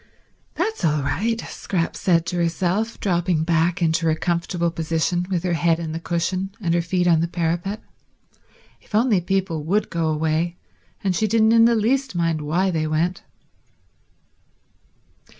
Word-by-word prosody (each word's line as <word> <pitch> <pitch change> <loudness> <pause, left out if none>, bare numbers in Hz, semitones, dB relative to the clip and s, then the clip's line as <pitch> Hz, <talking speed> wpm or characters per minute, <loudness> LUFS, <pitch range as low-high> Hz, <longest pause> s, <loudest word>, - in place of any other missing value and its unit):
"That's 440 - -2
all 150 -3 +2
right," 225 +10 -1
Scrap 170 -4 -3
said 170 -3 +2
to 180 - -3
herself, 175 +6 -1
dropping 175 -4 +1
back 170 +2 +1
into 165 0 +1
her 160 - +3
comfortable 170 +1 -1
position 165 +2 -1
with 180 -3 -1
her 180 -2 0
head 165 0 +2
in 165 -2 -4
the 165 - -4
cushion 180 +3 -2
and 170 -5 0
her 170 - +2
feet 180 +1 0
on 170 -2 +4
the 170 - 0
parapet; 175 +5 -2 1.0
if - - -8
only 220 -4 +3
people 180 -3 -1
would 200 +7 0
go 165 -2 0
away 160 +2 0 0.5
she 200 +5 +1
didn't 220 +1 +3
in 230 0 +6
the 235 0 +4
least 260 +3 0
mind 165 -2 0
why 175 +6 0
they 155 -2 -1
went. 165 +4 0
175 Hz, 155 wpm, -22 LUFS, 165-190 Hz, 1.0 s, in